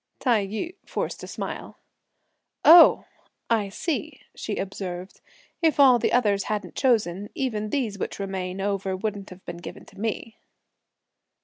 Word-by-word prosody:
Tai 225 -6 +2
yü 220 - -4
forced - - -4
a - - -6
smile. - - -6 0.9
"Oh! 335 +2 +9 0.5
I 210 -3 +2
see," 310 - -3
she 210 - -4
observed. 185 -1 -6 0.4
"If 320 -3 +2
all 260 -3 +7
the - - +1
others 205 -5 +2
hadn't 205 -4 -3
chosen, 205 -6 +1
even 215 -6 -2
these 220 -6 -2
which - - -4
remain 190 -1 -4
over 195 -1 -1
wouldn't 205 -1 -4
have 185 +1 -13
been 170 - -6
given 175 - -9
to 195 - -16
me." 220 +1 -4
205 Hz, 140 wpm, -25 LUFS, 195-245 Hz, 0.9 s, Oh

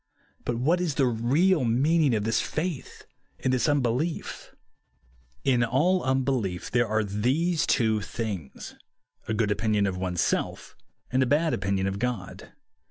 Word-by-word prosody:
But 120 - -1
what 160 +10 +1
IS 165 -6 -1
the 135 - +3
real 135 +9 +2
meaning 140 +4 +2
of 105 - -1
this 115 +1 +1
faith 160 -2 -4 0.4
o.nd 130 - +2
this 125 +2 +2
unbelief? 145 +3 -1 0.9
In 125 -3 +3
all 155 +11 +2
unbelief 130 -8 -1
there 120 -1 +2
are 110 0 +1
these 130 - 0
two 110 -4 +2
things, 100 - -6 0.3
— - - -37
a 110 - -1
good 105 -1 +1
opinion 105 -1 +1
of 95 -2 -2
one's 90 -2 -1
self, - - -2 0.4
and 130 +1 +2
a 130 - +2
bad 155 +4 +2
opinion 95 0 -1
of 95 +1 -2
God. 120 -6 -4
120 Hz, 155 wpm, -26 LUFS, 105-145 Hz, 0.9 s, the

